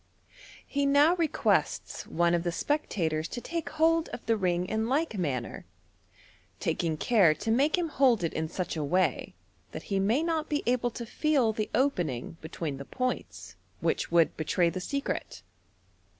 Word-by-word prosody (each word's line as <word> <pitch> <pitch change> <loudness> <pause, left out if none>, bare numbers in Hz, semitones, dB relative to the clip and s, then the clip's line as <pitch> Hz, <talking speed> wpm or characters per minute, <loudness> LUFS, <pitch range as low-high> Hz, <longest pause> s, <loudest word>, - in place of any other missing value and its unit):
He 285 0 0
now 290 +5 +5
requests 330 -3 0
one 170 +1 +2
of 170 - +2
the 175 0 -1
spectators 165 - -1
to 245 - -5
take 335 +5 -4
hold 325 +1 +2
of 240 - -8
the 225 - +2
ring 180 -3 0
in 220 +4 -1
like 290 -2 0
manner, 135 - -3 1.0
taking 160 -2 -1
care 190 -6 +4
to 225 +8 -2
make 280 +8 +3
him 350 -2 0
hold 255 - +3
it 165 - -1
in 160 0 -2
such 180 0 -3
a 155 - -2
way 180 +6 0 0.4
that - - -6
he 195 - +2
may 225 +10 +2
not 325 -2 -1
be 295 -1 -1
aole 245 0 +1
to 235 - -5
feel 265 -3 +1
the 215 -1 -3
opening 170 - -1
between 160 -3 -5
the 140 - -8
points, 255 - -4 0.2
which - - -1
would 170 -1 +4
betray 170 +2 +1
the 185 - -5
secret. 280 +8 -4
220 Hz, 165 wpm, -29 LUFS, 170-285 Hz, 1.0 s, now